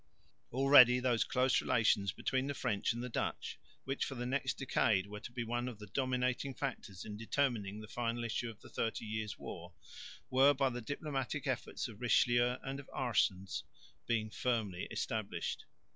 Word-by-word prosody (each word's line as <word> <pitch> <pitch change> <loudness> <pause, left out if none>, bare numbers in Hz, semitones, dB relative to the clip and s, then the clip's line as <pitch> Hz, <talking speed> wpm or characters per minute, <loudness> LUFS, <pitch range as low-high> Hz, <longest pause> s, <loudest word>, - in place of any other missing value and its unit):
Already 125 -1 +8
those 125 -2 +2
close 130 0 +2
relations 100 -4 +3
between 130 +5 -1
the 145 - -2
French 110 -7 0
and 120 +1 -4
the - - -3
Dutch, - - -3 0.2
which 135 +1 -2
for 135 - -3
the 120 0 -3
next 130 +1 -1
decade 110 -7 +2
were 105 +1 -7
to 120 - -9
be 120 0 -3
one 120 +2 -2
of 120 -4 -6
the 105 - -9
dominating 130 +3 -1
factors 110 -8 -5
in 105 -1 -6
determining 115 -4 0
the 110 - -9
final 120 +1 -2
issue 115 +1 -2
of 110 -2 -11
the - - -13
Thirty 115 0 -2
Years' 110 0 -3
War, 85 +1 -8 0.6
were 135 +3 +6
by 135 -1 +2
the 120 +1 -4
diplomatic 140 +2 -3
efforts 130 -1 -2
of 110 -2 -12
Richelieu 120 0 +3
and 135 +1 -4
of 140 - -10
Aerssens 95 -7 0 0.5
being 110 -2 0
firmly 110 -8 -1
established. 110 -2 -3
120 Hz, 175 wpm, -35 LUFS, 110-130 Hz, 0.6 s, Already